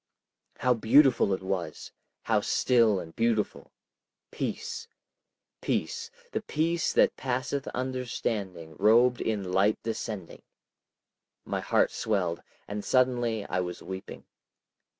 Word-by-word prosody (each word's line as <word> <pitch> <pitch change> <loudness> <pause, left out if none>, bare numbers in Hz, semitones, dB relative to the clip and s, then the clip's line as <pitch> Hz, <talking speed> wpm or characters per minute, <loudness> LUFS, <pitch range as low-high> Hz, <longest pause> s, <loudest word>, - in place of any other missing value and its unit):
How 125 0 +3
beautiful 120 0 +5
it 95 0 -1
was! 90 -5 -4 0.3
how - - +2
still 115 -6 +3
and 80 -2 -9
beautiful! 115 -2 0 0.6
Peace! 460 0 -4 0.7
peace!—the 480 - -3
peace 165 -3 0
that - - +4
passeth 130 +2 -2
understanding, 115 -10 -3
robed 120 +3 +5
in 100 -5 -2
light 100 +3 +3
descending!... 110 -5 -5 1.0
My - - -2
heart - - +2
swelled, 90 -6 -1 0.3
and 105 0 -4
suddenly 120 -4 +1
I 90 - -1
was 90 -1 -4
weeping. 95 0 -8
115 Hz, 105 wpm, -28 LUFS, 95-130 Hz, 1.0 s, beautiful